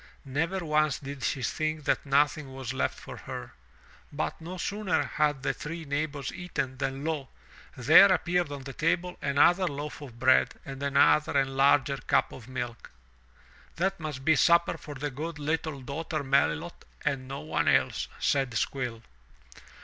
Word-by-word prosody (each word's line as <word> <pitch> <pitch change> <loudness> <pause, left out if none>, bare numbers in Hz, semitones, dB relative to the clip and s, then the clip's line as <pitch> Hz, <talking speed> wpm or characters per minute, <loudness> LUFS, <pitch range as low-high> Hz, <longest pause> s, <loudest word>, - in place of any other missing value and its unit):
Never 165 +7 -1
once 155 -2 +2
did 140 -1 -8
she 130 - -1
think 155 +3 -1
that 140 - 0
nothing 140 0 +2
was 130 -2 -4
left - - -1
for - - -9
herself. - - -7 0.6
But 80 - -3
no 175 +3 -7
sooner 200 +1 0
had 145 -3 0
the - - +1
three 165 +1 -6
neighbors 145 0 -3
eaten, 150 -8 -4
than 135 +1 -2
lo! 150 -5 -2 0.5
there 155 +10 +8
appeared 175 -3 +1
on 140 -2 -6
the 135 0 -7
table 180 +5 0
another 170 +6 +4
loaf 145 0 -5
of 125 -5 -10
bread 130 0 +4
and 135 0 -7
another 140 +1 +3
and 135 -1 +1
larger 140 0 +4
cup 125 - +1
of 120 -3 -11
milk. 120 -2 -5 0.9
"That 195 +2 0
must 150 -5 -6
be 160 - +5
supper 170 +3 +4
for 145 - -9
the 145 +2 -3
good 155 +4 -5
little 155 -1 -2
daughter 155 +4 -4
Melilot 140 +5 0 0.2
and 135 -3 -1
no 135 +1 -5
one 155 - -1
else,'* - - +2
said 135 -3 +1
Squill. 120 -2 -2
145 Hz, 160 wpm, -28 LUFS, 135-160 Hz, 0.9 s, there